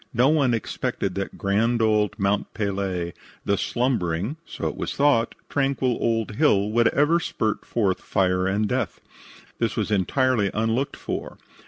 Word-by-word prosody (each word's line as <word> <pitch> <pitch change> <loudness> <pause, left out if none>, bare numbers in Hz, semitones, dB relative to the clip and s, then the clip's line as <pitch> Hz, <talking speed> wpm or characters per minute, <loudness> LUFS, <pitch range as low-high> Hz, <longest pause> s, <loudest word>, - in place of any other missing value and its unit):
No 125 +4 +4
one 140 -6 +3
expected 100 -3 -3
that 100 +1 -4
grand 110 +5 +1
old 105 -2 +2
Mount 100 0 0
Pelee, 95 -4 -2 0.3
the 100 - +2
slumbering 110 - -1
(so - - -4
it - - -3
was - - -4
thought) 140 -5 +3
tranquil 135 -3 0
old 115 -2 0
hill, 105 -9 +3
would 120 +1 +4
ever 150 +7 +3
spurt 110 -8 -2
forth 100 -6 0
fire 90 -2 +1
and 105 +2 +1
death. - - -2 0.6
This - - 0
was - - -1
entirely 105 +2 +2
unlooked 115 +6 0
for. - - -5
110 Hz, 150 wpm, -24 LUFS, 100-125 Hz, 0.6 s, No